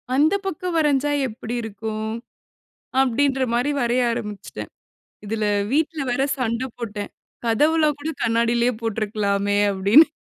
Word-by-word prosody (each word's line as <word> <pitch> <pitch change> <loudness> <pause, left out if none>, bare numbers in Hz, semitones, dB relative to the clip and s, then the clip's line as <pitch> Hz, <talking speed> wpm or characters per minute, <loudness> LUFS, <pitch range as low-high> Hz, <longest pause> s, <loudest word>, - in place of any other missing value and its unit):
அந்த 305 +5 +4
பக்கம் 360 -1 -3
வரஞ்சா 290 -1 +2 0.2
எப்பிடி 230 +1 -6
இருக்கும்? 220 0 -4 0.9
அப்பிடின்றமாரி 260 0 +1
வரைய 240 +1 +2
ஆரம்பிச்சுட்டேன். 200 - -6 0.6
இதில 220 +1 -1 0.3
வீட்ல 310 +1 +1
வேற 245 - +1 0.2
சண்ட 235 -1 -1 0.2
போட்டேன். 210 -3 -5 0.4
கதவுல்லாம் 300 +5 +3
கூட 310 +2 -3
கண்ணாடிலயே 235 +1 +2
போட்ருக்கலாமே! 205 -2 0
அப்பிடின்னு 200 +12 +6
235 Hz, 105 wpm, -23 LUFS, 215-285 Hz, 0.9 s, அப்பிடின்னு